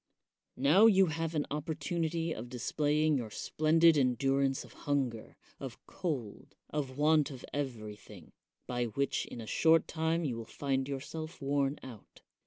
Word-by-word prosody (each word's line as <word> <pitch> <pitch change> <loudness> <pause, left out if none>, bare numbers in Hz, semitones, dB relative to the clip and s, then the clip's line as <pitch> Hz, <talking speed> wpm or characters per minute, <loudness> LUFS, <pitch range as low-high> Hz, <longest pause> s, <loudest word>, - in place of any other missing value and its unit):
Now 155 - +6
you 195 -3 +6
have 165 0 -2
an 150 - +1
opportunity 160 +2 -2
of 120 +3 -7
displaying 150 +5 +1
your 115 -4 -4
splendid 155 +7 +3
endurance 135 +1 +1
of - - -15 0.2
hunger, 130 -6 -1 0.2
of 135 -4 -7
cold, 140 - -5 0.2
of 140 -3 -3
want 150 0 +4
of 130 -3 -9
everything; 110 -7 -6 0.3
by 120 -1 -1
which 135 +5 -1
in - - -8
a 115 - -6
short 160 +8 +3
time 160 +1 0
you 125 -5 -2
will 115 - -5
find 135 +1 -2
yourself 155 +4 -6
worn 140 0 0
out. 120 -6 -12
140 Hz, 145 wpm, -32 LUFS, 130-160 Hz, 0.3 s, Now